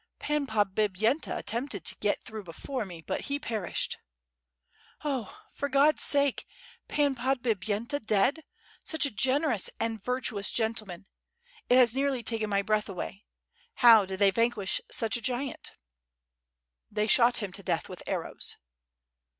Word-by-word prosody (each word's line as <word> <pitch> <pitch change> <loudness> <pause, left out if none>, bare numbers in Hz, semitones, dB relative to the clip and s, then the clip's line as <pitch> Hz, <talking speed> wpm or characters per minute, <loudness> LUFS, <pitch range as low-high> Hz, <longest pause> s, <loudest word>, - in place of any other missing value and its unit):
"Pan 295 -1 -1
Podbipyenta 215 - +1
attempted 230 - -3
to - - +2
get 205 - -1
through 220 -2 -7
before 215 - -5
me, 170 -4 -10
but - - -3
he 280 0 -1
perished.".... 220 -9 -3 1.0
"Oh! 290 - -3
for 285 - -3
God's 280 +3 +4
sake! 280 -2 +3 0.4
Pan 290 -2 +2
Podbipyenta 235 -1 -1
dead! 215 +9 +2 0.4
such 315 -2 0
a 280 - -2
gen 260 +8 +1
erous 235 - 0
and 225 -3 -2
virtuous 245 -4 0
gentleman! 215 -5 -2 0.6
It 250 - +6
has 240 -3 +6
nearly 270 -2 0
taken 220 -1 -1
my 200 -1 +1
breath 215 0 0
away. 195 +2 -6 0.5
How 230 -4 +7
did 190 0 -5
they 200 0 +5
vanquish 230 -2 0
such 225 +1 0
a - - -9
giant?" 255 +3 -2 1.2
"They 210 0 0
shot 240 +2 +5
him 205 -4 -3
to 195 - -4
death - - -1
with - - -9
arrows." - - -3
230 Hz, 140 wpm, -29 LUFS, 205-270 Hz, 1.2 s, How